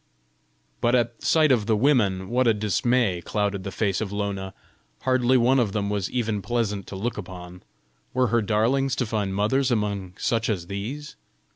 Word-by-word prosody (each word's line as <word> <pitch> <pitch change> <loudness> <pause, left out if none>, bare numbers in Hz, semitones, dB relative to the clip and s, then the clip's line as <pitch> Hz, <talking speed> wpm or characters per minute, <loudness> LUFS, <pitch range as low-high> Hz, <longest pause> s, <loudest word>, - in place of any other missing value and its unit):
But 120 +1 +3
at 120 -1 0
sight 155 -3 +4
of 110 -5 +2
the 110 - +3
women 105 -8 +2
what 125 +1 +2
a 115 - +4
dismay 105 -1 +1
clouded 100 -1 -1
the 100 - -4
face 100 -1 -1
of 105 -3 -3
Lona! 100 -2 -3 0.5
Hardly 130 0 +3
one 130 +2 +4
of 110 -5 0
them 100 -1 -1
was 100 -3 -1
even 110 -4 -1
pleasant 105 -2 -2
to - - -7
look 110 +3 -3
upon! 90 -2 -9 0.5
Were 125 -1 +1
her 120 - +4
darlings 115 +6 +1
to 125 - 0
find 105 -3 -2
mothers 125 +7 +1
among 100 -5 -2
such 115 -1 0
as 95 -6 -1
these? 115 +11 -6
110 Hz, 175 wpm, -25 LUFS, 100-120 Hz, 0.5 s, sight